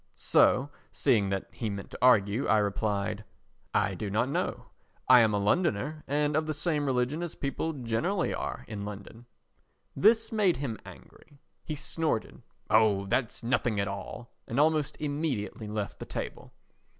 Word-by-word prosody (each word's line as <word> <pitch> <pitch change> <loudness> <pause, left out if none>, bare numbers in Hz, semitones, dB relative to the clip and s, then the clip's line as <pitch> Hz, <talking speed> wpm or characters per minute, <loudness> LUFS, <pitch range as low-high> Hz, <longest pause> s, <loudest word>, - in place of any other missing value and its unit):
So, 140 +3 +3 0.2
seeing 110 -8 +2
that 95 -1 -2
he 110 +3 -4
meant 100 -1 -6
to - - -7
argue, 110 -2 +4
I 110 - +4
replied: 105 0 -1 0.5
"I 95 - +1
do 100 +3 -4
not 110 +6 +1
know. - - -2 0.4
I 125 -1 +9
am 110 -2 +4
a 105 - +1
Londoner 150 - 0
and 145 +1 +1
of 155 0 +1
the 155 - -1
same 150 -2 0
religion 130 +4 0
as 175 -2 -4
people 145 +3 -2
generally 145 - -1
are - - -4
in 105 -2 -5
London." 105 +3 -9 0.7
This 225 +3 +4
made 205 - +2
him 125 -5 -4
angry. 145 - -15 0.3
He 155 - -4
snorted: 150 -5 -2 0.3
"Oh, 105 -3 +4
that's 120 +3 -1
nothing 120 -3 +1
at 100 - 0
all;" 100 +4 -7 0.2
and 120 - -1
almost 155 -1 +2
immediately 145 -8 -3
left 105 -1 -4
the - - -6
table. - - -6
125 Hz, 160 wpm, -29 LUFS, 105-150 Hz, 0.7 s, I